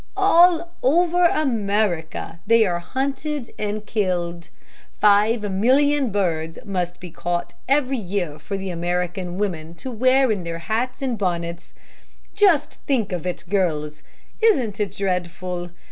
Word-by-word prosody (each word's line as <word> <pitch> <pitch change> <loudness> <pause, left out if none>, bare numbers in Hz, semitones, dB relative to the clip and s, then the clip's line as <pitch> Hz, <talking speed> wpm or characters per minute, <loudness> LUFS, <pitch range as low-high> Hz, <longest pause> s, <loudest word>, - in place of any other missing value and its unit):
All 345 -3 +5
over 345 +5 +3
America 205 - -1
they 230 -1 +5
are 175 -3 0
hunted 275 - -3
and 210 0 -3
killed. 175 -5 -2 0.5
Five 210 +2 +4
million 265 +6 +3
birds 165 -5 -1
must 180 -3 -3
be 180 -2 -9
caught 175 +1 -3 0.2
every 270 -2 +2
year 180 -6 -3
for 200 - -5
American 180 0 -2
women 170 -5 -3
to 255 +10 -7
wear 255 +2 +3
in 200 -4 -1
their 165 0 -4
hats 225 +10 -2
and 245 -5 -1
bonnets. 170 -3 -3 0.6
Just 390 -8 +3
think 240 -8 +1
of 180 0 -3
it, 180 - -4
girls, 155 -6 -1 0.4
Isn't 255 - +2
it 200 -3 -1
dreadful? 180 -2 -2
200 Hz, 130 wpm, -22 LUFS, 175-255 Hz, 0.6 s, All